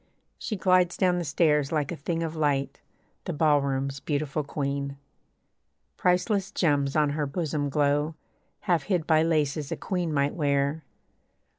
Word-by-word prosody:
She 215 - -3
glides 180 -2 +3
down 180 -2 +2
the - - -2
stairs 150 -1 +2
like 150 -3 0
a - - -3
thing 165 +4 -3
of 165 0 -4
light, 145 -3 0 0.5
The - - -3
ballroom's 140 -3 +1
beautiful 145 +2 -2
queen. 140 -1 -3 1.0
Priceless 190 +2 +1
gems 145 -5 +1
on 150 -2 +3
her 150 0 -1
bosom 150 -1 -2
glow 145 +2 +1 0.5
Half 175 -5 +1
hid 180 -6 0
by 155 -2 +4
laces 155 -3 0
a - - -2
queen 180 -4 -2
might 140 -1 +1
wear. 140 0 0
150 Hz, 145 wpm, -27 LUFS, 140-165 Hz, 1.0 s, by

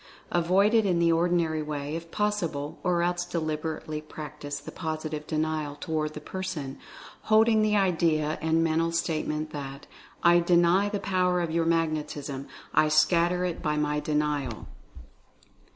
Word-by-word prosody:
Avoid 185 +5 +3
it 225 -1 +5
in 185 -4 +1
the 170 0 +3
ordinary 165 -2 +1
way, 150 0 -4
if 165 0 -6
possible, 170 -8 -2
or 175 -1 +1
else 175 0 0
deliberately 155 -2 -3
practice 150 -1 -7
the 140 - -9
POS 160 -2 -4
ITIVE 150 -1 -5
DENIAL 155 -2 -1
toward 155 -1 -3
the - - -5
person, 150 -5 -5 0.5
holding 220 0 +5
the 215 0 +2
idea 165 -5 +1
and 160 +1 +2
mental 165 +1 +1
statement 155 -2 -1
that 140 -1 -7 0.4
"I 175 0 +6
DENY 175 +3 +3
the 205 -1 -2
power 180 -2 +1
of 170 -2 -1
your 165 0 +1
magnetism 150 -4 -1
— - - -23
I 155 - +4
scatter 170 +3 +3
it 175 -2 -3
by 150 0 0
my 150 0 0
Denial." 150 -6 -1
160 Hz, 150 wpm, -27 LUFS, 150-175 Hz, 0.5 s, I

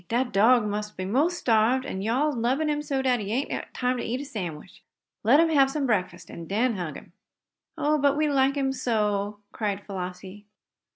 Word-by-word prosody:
Dat 245 +2 0
dog 225 +4 +5
must 210 +1 -4
be 185 - -3
mos' 290 - +1
starved, 235 +2 +2
an' 190 -8 -4
yo' 225 +4 0
all 295 +4 +2
is 290 - -3
lubbin 260 +7 0
him 295 0 -1
so 275 -3 -2
dat 250 -2 +2
he 205 -1 -4
ain't 265 +5 -3
time 250 0 0
to - - -3
eat 245 +3 -2
a 285 - -6
sandwich. 185 - -7 0.4
Let 250 +7 +5
him 330 0 +4
hab 275 -4 +4
some 280 0 -2
breakfast, 180 -7 -2
an' 165 -1 -8
den 230 +4 +1
hug 175 -5 -4
him!" - - -12 0.7
"Oh, 305 0 +1
but 285 0 +2
we 305 0 +2
like 275 -1 +2
him 270 -1 0
so!" 210 -5 -1
cried 205 -2 -3
Flossie. 190 +1 -7
240 Hz, 210 wpm, -26 LUFS, 205-275 Hz, 0.7 s, dog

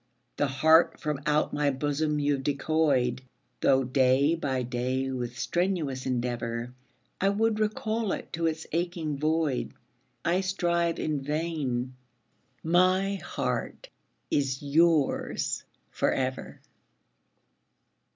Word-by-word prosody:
The 145 - +2
heart 160 +5 +4
from 150 -3 -2
out 150 0 +2
my 145 -1 +2
bosom 145 +2 0
you've 145 -2 +1
decoyed, 140 -3 +1 0.4
Though 135 +3 +4
day 130 +3 +3
by 135 -6 -1
day 130 +2 -1
with 125 -1 -4
strenuous 165 -7 -1
endeavour 120 -1 -2 0.5
I 195 - +4
would 215 +2 +1
recall 215 0 -1
it - - -5
to 165 0 0
its 160 0 -3
aching 165 -3 -2
void. 155 -3 0 0.5
I 175 +3 +2
strive 170 -3 0
in 150 -3 -1
vain 145 -4 -2 0.7
my 185 +4 +3
heart - - -3 0.4
is 135 -1 0
yours 155 0 +1 0.3
for - - +1
ever. 130 0 -3
150 Hz, 110 wpm, -28 LUFS, 130-170 Hz, 0.7 s, heart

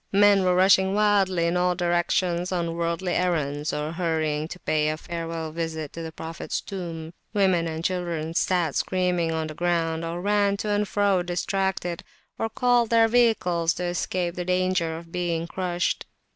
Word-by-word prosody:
Men 200 -1 +5
were 180 -1 +3
rushing 190 +1 +4
wildly 195 -4 +3
in 170 +1 +1
all 180 0 +2
directions 175 0 0
on 170 -2 -1
worldly 170 +2 -1
errands, 150 -5 0
or 150 +1 -3
hurrying 160 -3 -1
to 180 - -8
pay 150 -1 +1
a 155 - -2
farewell 165 -1 -5
visit 160 -2 -4
to 165 - -6
the 160 -1 -6
Prophets 165 +2 -5
Tomb. 170 -4 -6 0.2
Women 185 -4 +3
and 160 0 -4
children 170 -3 -2
sat 170 -3 +1
screaming 180 -3 0
on 160 -1 -1
the 155 - -6
ground, 165 -1 0
or 165 +1 -3
ran 200 +1 +2
to 210 - -3
and 205 0 +1
fro 200 -3 +2
distracted, 180 0 -2 0.4
or 225 - -1
called 240 0 +2
their 230 -1 +5
vehicles 215 -8 +2
to 180 - -4
escape 175 0 -1
the 180 - -4
danger 180 -3 0
of 165 0 -12
being 170 -2 -1
crushed. 175 0 -2
175 Hz, 170 wpm, -25 LUFS, 165-190 Hz, 0.4 s, Men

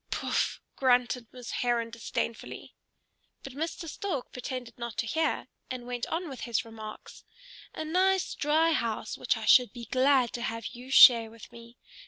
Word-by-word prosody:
"Pouf!" - - -1 0.2
grunted 250 -2 +2
Miss 250 -2 -8
Heron 235 -2 0
disdainfully. 230 0 -5 0.7
But 275 - -8
Mr. 325 +3 -4
Stork 315 -4 -4
pretended 250 -2 -6
not 235 -2 -6
to - - 0
hear, 315 +7 0 0.2
and 255 -2 -6
went 245 -1 -4
on 345 +2 -3
with 270 -4 -8
his 230 -2 -2
remarks, 220 -1 -10 0.5
"a 315 - -4
nice 370 +3 +1
dry 315 +3 +2
house 230 -8 -2
which - - 0
I - - -5
should 250 -5 +6
be 235 -1 -8
glad 260 -1 +3
to 240 - -4
have 230 0 -4
you 250 +1 -11
share 235 -4 +8
with 225 +1 -14
me. 235 0 -14
245 Hz, 165 wpm, -29 LUFS, 230-285 Hz, 0.7 s, share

